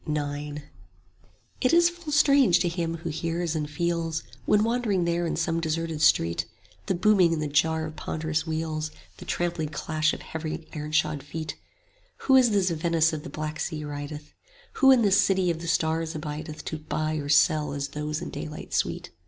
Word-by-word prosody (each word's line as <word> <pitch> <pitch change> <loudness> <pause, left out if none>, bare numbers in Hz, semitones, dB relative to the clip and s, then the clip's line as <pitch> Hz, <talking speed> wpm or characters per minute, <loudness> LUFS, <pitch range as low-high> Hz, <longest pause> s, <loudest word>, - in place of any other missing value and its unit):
IX 145 0 -3 1.0
It 255 - +3
is 345 0 +6
full 345 -3 -8
strange 280 - +5
to 180 - +2
him 170 -1 -2
who 165 +1 -5
hears 165 +1 -2
and 150 -1 -2
feels, 165 0 -1 0.2
When 210 0 +4
wandering 225 -6 +1
there 170 0 0
in - - -1
some 165 +1 0
deserted 160 -1 -2
street, 85 - +3 0.4
The 190 - +1
booming 185 -2 +4
and 165 - -1
the - - -1
jar 160 +2 +1
of 155 0 -7
ponderous 155 +1 -2
wheels, 155 -1 -2 0.3
The - - -10
trampling 170 -3 -1
clash 155 +1 0
of - - -10
heavy 160 0 -5
ironshod 150 -1 0
feet: 155 +3 -6 0.7
Who 265 - +4
in 250 -3 +6
this 195 -3 +2
Venice 165 0 +2
of 155 - -3
the 165 - -8
Black 155 0 -5
Sea 155 -1 -3
rideth? 145 +1 -6
5 - - -30 0.5
Who 270 - +6
in 255 -3 +6
this 200 -1 +5
city 190 -2 +2
of 165 0 -5
the 170 - -6
stars 160 -1 0
abideth 155 0 -6
To 160 - -4
buy 155 0 -2
or 145 -1 -4
sell 150 +1 +4
as 140 0 -3
those 150 +1 -4
in - - -6
daylight 150 0 -7
sweet? - - -1
160 Hz, 185 wpm, -26 LUFS, 155-175 Hz, 1.0 s, is